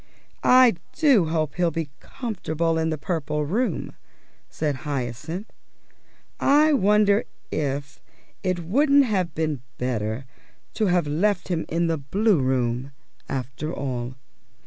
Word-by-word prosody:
"I 255 -1 +7 0.2
do 275 - +4
hope 155 -3 -1
he'll 175 -1 +1
be 160 -2 -4
comfortable 170 - -2
in 160 0 0
the 155 - -1
Purple 150 -2 -2
Room," 205 - -1 0.5
said 150 -3 -2
Hyacinth. 140 - -4 0.9
"I 300 +2 +5
wonder 210 -3 +4 0.3
if 140 -1 -3 0.4
it 185 -3 -1
wouldn't 280 - +4
have 190 -7 -1
been 155 -5 -1 0.2
better 115 0 -2 0.5
to 215 - +1
have 175 -3 +2
left 180 +7 0
him 170 -3 -1
in 170 +1 +1
the 165 -2 0
Blue 195 +6 +2
Room, 130 0 0 0.4
after 135 +3 -4
all." 130 -4 -4
160 Hz, 125 wpm, -24 LUFS, 140-205 Hz, 0.9 s, I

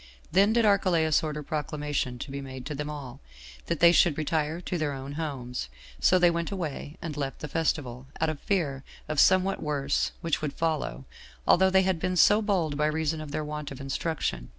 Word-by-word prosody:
Then 195 +4 +5
did 235 -1 +3
Archelaus 175 -6 +3
order 150 -1 -4
proclamation 145 -3 -2
to 135 +3 -7
be 140 0 -4
made 130 -1 -8
to 150 - -4
them 150 +1 -4
all, 140 -5 -7 0.5
that 170 - -2
they 170 0 +8
should 170 -3 +4
retire 155 +1 -1
to 180 0 -3
their 150 -2 -1
own 135 +1 -6
homes; 135 - -4 0.3
so 185 - +5
they 175 -1 +5
went 170 0 -2
away, 160 -5 -5
and 160 -3 -4
left 140 -2 -3
the 150 - -6
festival, 135 -5 -2
out 160 - +2
of 155 -2 -4
fear 145 -9 -1 0.2
of 155 -2 -1
somewhat 185 +3 +4
worse 145 -2 0
which 165 -2 -1
would 150 -2 -2
follow, 155 - -2 0.4
although 190 +2 +5
they 190 0 +4
had 185 -3 0
been 185 +1 -1
so 210 +4 +6
bold 180 -9 0
by 150 0 +2
reason 155 0 -1
of 155 - -7
their 150 +1 -3
want 150 -1 -5
of 135 - -9
instruction. 135 - -3
155 Hz, 200 wpm, -28 LUFS, 140-170 Hz, 0.5 s, they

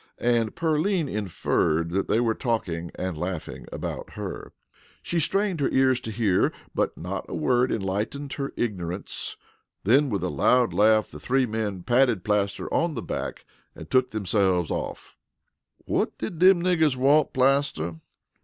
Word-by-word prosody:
and 120 -2 +1
Pearline 165 +1 +1
inferred 85 -6 0
that 95 +2 0
they 110 - +2
were 115 -2 +2
talking 90 -9 -2
and 90 -2 -3
laughing 90 -2 -5
about - - -5
her. - - -6 0.5
She 170 - -1
strained 195 +2 0
her 140 - +1
ears 130 -1 +3
to 115 - -6
hear, 105 -4 +2 0.2
but - - -1
not - - -5
a - - -4
word 125 0 +2
enlightened 110 +8 -2
her 140 0 -3
ignorance. 95 -5 -3 0.5
Then 135 +8 +4
with 100 -5 -2
a 90 - 0
loud 125 +4 +3
laugh 110 +1 +3
the - - -9
three 130 +1 +1
men 105 -5 -3
patted 120 -5 +3
Plaster 100 -1 0
on 165 -2 +1
the - - -4
back - - -5 0.3
and - - -11
took 130 -1 +3
themselves 95 -5 +1
off. - - -5 0.7
"Whut - - 0
did 155 +9 -5
them 185 -1 +6
niggers 160 -6 +3
want, 140 +4 +3
Plaster?" 130 - +1
115 Hz, 155 wpm, -25 LUFS, 100-140 Hz, 0.7 s, them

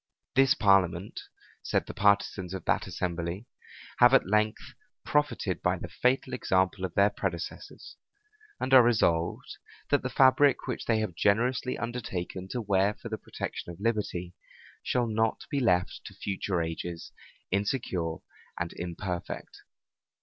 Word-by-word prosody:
This 135 +2 +5
parliament, 95 - +2 0.4
said - - 0
the - - -7
partisans 100 -2 +1
of 95 - -7
that - - +1
assembly, 85 +3 -3 0.5
have 125 +2 +7
at - - +4
length 105 +2 0 0.3
profited 150 0 0
by - - +1
the - - -7
fatal 130 0 0
example 95 -5 +1
of 90 - -7
their 100 +1 +4
predecessors; 90 -4 -6 0.6
and 130 - -1
are 130 - +10
resolved, 85 -8 +1 0.3
that - - +4
the - - -3
fabric 135 +1 +4
which 125 - -4
they 115 - +2
have 105 -5 -3
generously 120 +7 +1
undertaken 100 -6 -4
to 120 +5 -3
wear 100 0 +2
for 115 - -9
the 110 -1 -4
protection - - -6
of 85 - -12
liberty, 100 -5 -2 0.5
shall 125 -1 0
not 110 0 0
be 140 - +1
left 90 -8 +1
to - - -10
future 95 -3 -2
ages 80 +1 -5 0.4
insecure 95 -5 -1 0.4
and 85 -1 -3
imperfect. 90 0 -5
100 Hz, 140 wpm, -28 LUFS, 90-120 Hz, 0.6 s, are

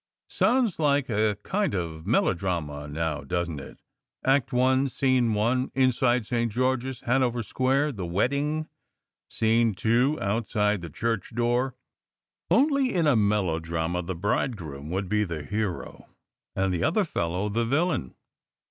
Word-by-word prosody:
Sounds 240 -8 +2
like 145 -3 +2
a 105 -2 +1
kind 200 - 0
of 80 -2 -4
melodrama 85 -9 0
now, 75 0 -2
doesn 85 +2 -2
t 70 - -7
it? - - -13 0.5
Act 135 -1 +2
one, 130 +2 +3
scene 130 -4 +1
one, 120 +5 +1
in 130 -1 +4
side 120 -1 +1
St. 115 -1 -1
George 130 +2 0
s, 130 -2 -6
Hanover 125 -1 +1
Square; 135 +6 +1
the 100 -8 -5
wedding. 140 - 0 0.6
Scene 115 -1 +2
two, 120 +9 +2
outside 105 -1 0
the 85 - -7
church 115 +5 -3
door. 120 +2 +1 0.7
Only, 275 0 +3
in 170 -3 +2
a 145 -4 +4
melodrama, 85 -5 0
the 90 +1 -4
bridegroom 85 - -2
would 95 +2 -2
be 105 +2 +1
the 85 -6 -4
hero, 105 +2 -4 0.5
and 95 -1 +1
the 85 - -1
other 205 +6 +2
fellow 90 - -2
the 115 +3 0
villain. 140 - 0
115 Hz, 145 wpm, -26 LUFS, 90-130 Hz, 0.7 s, in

